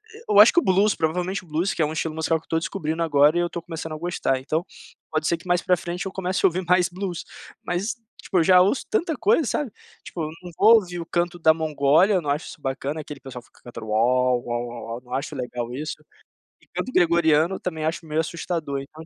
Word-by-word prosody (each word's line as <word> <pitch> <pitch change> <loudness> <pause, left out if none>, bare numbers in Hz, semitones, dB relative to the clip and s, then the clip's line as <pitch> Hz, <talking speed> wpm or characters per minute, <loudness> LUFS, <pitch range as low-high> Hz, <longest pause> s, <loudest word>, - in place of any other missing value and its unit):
Eh, 460 - -13
eu 205 - +5
acho 220 - +8
que - - +5
o - - -2
blues, 195 +2 +3
provavelmente 180 +4 -1
o - - -19
blues, 165 +5 -1
que - - -2
é 155 - +4
um 155 - -3
estilo 160 0 -3
musical 160 0 +1
que - - -25
eu - - -47
estou 165 - 0
descobrindo 160 +1 -3
agora 150 +1 +4
e - - +3
eu 175 - +1
estou 170 - -6
começando 160 -1 -6
a - - -5
gostar. 160 -5 -1
Então, 155 +6 -2 0.5
pode 155 0 -1
ser 170 - +1
que 175 - -15
mais 175 0 +2
para 180 0 +2
frente 175 +2 -5
eu 190 - -4
comece 185 0 -1
a - - +9
ouvir 180 +2 -3
mais 180 0 +3
blues, 180 -1 -5 0.4
mas, 190 +7 -2 0.3
tipo, 190 - -2
eu - - +4
já 180 +2 +6
ouço 200 +9 +1
tanta 345 -7 0
coisa, 390 - +3
sabe? 275 -1 -2 0.3
Tipo, 170 - -6
eu 155 - -3
não 175 - -8
vou 220 +3 +7
ouvir 180 -5 0
o - - -6
canto 175 +1 -1
da 160 -1 +5
Mongólia, 160 +5 +3
não 150 - -4
acho 145 +3 -1
isso 150 - -11
bacana, 140 +3 -3
aquele 145 -1 -9
pessoal 130 -2 -9
fica - - -25
cantando 115 -2 -9
uau, 125 +3 +2
uau, 120 0 -2
uau, 120 0 -8
uau, 115 +2 -6
não 125 0 -10
acho 135 +1 -3
legal 125 -1 -4
isso. 150 +4 -4 0.7
E - - -26
canto 255 - -4
gregoriano 170 -1 +3
também 160 -3 -4
acho 165 +1 -2
meio 155 0 -1
assustador, 160 -3 -3
então. 155 +3 -12
165 Hz, 250 wpm, -24 LUFS, 150-180 Hz, 0.7 s, a